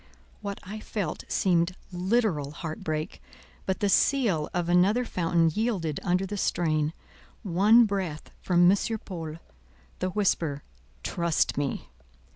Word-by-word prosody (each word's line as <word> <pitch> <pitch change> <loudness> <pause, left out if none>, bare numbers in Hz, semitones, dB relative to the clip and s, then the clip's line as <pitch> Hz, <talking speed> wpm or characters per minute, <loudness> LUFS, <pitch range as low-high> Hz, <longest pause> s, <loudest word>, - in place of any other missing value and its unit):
What 200 -1 -4
I 210 +4 -7
felt 210 -3 -4
seemed 175 -1 +1 0.2
literal 180 -5 0
heart 160 +1 -6
break; 155 +2 -3 0.5
but 190 -1 -1
the 205 - +3
seal 200 - +2
of 175 -1 -1
another 190 +8 +3
fountain 170 -4 +1
yielded 195 -9 -1
under 185 0 +1
the 205 +2 -5
strain: 155 -4 0 0.5
one 210 +5 +5
breath 190 -7 -3
from 175 -1 +4
M. - - +5 0.3
Paul, 165 -5 -6 0.6
the 185 - 0
whisper, 170 -7 0 0.4
"Trust 170 -2 0
me!" 140 - -2
180 Hz, 125 wpm, -27 LUFS, 165-200 Hz, 0.6 s, one